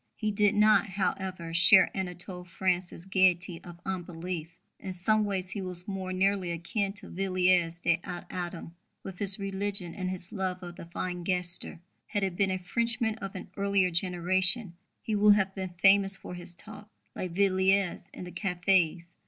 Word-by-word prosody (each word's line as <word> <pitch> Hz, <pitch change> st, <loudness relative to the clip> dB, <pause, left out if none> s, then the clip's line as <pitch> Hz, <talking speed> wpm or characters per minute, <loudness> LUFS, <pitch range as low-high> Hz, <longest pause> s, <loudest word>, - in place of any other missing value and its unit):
He 215 Hz, -1 st, -1 dB
did 205 Hz, 0 st, +2 dB
not, 215 Hz, +1 st, +5 dB
however, 185 Hz, -3 st, -3 dB
share 180 Hz, +3 st, +6 dB
Anatole 180 Hz, -1 st, -5 dB
France's 180 Hz, 0 st, -2 dB
gaiety 185 Hz, -2 st, +2 dB
of 175 Hz, -1 st, -11 dB
unbelief. 175 Hz, -2 st, -5 dB, 0.2 s
In 190 Hz, -, -6 dB
some 210 Hz, +4 st, +2 dB
ways 190 Hz, -2 st, -3 dB
he 205 Hz, -, -4 dB
was 180 Hz, -1 st, -3 dB
more 190 Hz, -2 st, -4 dB
nearly 190 Hz, 0 st, +1 dB
akin 195 Hz, +4 st, -2 dB
to 205 Hz, -, -10 dB
Villiers 180 Hz, -2 st, +1 dB
de 170 Hz, -1 st, +2 dB
l'Isle 175 Hz, -2 st, -6 dB
Adam, 175 Hz, -2 st, -6 dB, 0.3 s
with 190 Hz, -2 st, -8 dB
his 195 Hz, -1 st, +2 dB
religion 195 Hz, -3 st, -2 dB
and 185 Hz, 0 st, -3 dB
his 185 Hz, -1 st, -1 dB
love 185 Hz, -2 st, -3 dB
of 175 Hz, 0 st, -8 dB
the 170 Hz, -, -10 dB
fine 180 Hz, +1 st, -4 dB
gesture. 180 Hz, -1 st, -1 dB, 0.3 s
Had 205 Hz, -, -2 dB
he 195 Hz, -, +2 dB
been 190 Hz, +2 st, 0 dB
a 185 Hz, -, 0 dB
Frenchman 230 Hz, +5 st, -1 dB
of 195 Hz, -1 st, -6 dB
an 185 Hz, -, -8 dB
earlier 200 Hz, -2 st, +2 dB
generation, 185 Hz, +3 st, +2 dB, 0.3 s
he 220 Hz, -, -2 dB
would 205 Hz, 0 st, +6 dB
have 195 Hz, -2 st, 0 dB
been 185 Hz, -2 st, -6 dB
famous 195 Hz, 0 st, +5 dB
for -, -, -9 dB
his 175 Hz, 0 st, -5 dB
talk, 210 Hz, +2 st, -12 dB, 0.3 s
like 180 Hz, -2 st, -4 dB
Villiers, 190 Hz, 0 st, +2 dB
in -, -, -9 dB
the 180 Hz, -, -8 dB
cafés. 175 Hz, -1 st, 0 dB
185 Hz, 170 wpm, -29 LUFS, 175-195 Hz, 0.3 s, share